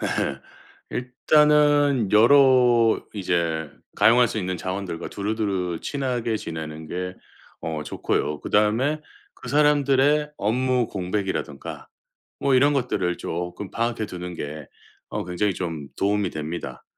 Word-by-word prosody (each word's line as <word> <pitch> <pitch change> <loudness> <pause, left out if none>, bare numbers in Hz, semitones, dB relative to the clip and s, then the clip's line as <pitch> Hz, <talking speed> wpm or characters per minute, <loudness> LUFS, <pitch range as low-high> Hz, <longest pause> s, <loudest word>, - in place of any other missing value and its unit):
네. 65 - -1 0.5
일단은 145 -1 +3
여러 120 -1 +5
이제 85 -5 -1 0.3
가용할 120 +1 +5
수 110 - -3
있는 95 -2 -2
자원들과 95 -2 -4
두루두루 100 -5 -2
친하게 125 -5 -2
지내는 80 -4 -6
게 90 +3 -4 0.5
어 80 -2 -3
좋고요. 75 0 -2
그다음에 115 +9 +2 0.3
그 - - -11
사람들의 145 0 +3
업무 125 +3 +1
공백이라든가 95 -6 -4 0.5
뭐 140 - +2
이런 145 +3 +4
것들을 95 -10 0
쪼끔 90 +3 -5
파악해 115 -1 -1
두는 90 -2 -7
게 75 -2 -6 0.4
어 - - -4
굉장히 90 +3 -1
좀 80 -6 -5
도움이 100 0 +1
됩니다. 80 +2 -6
105 Hz, 265 characters per minute, -24 LUFS, 90-130 Hz, 0.5 s, 여러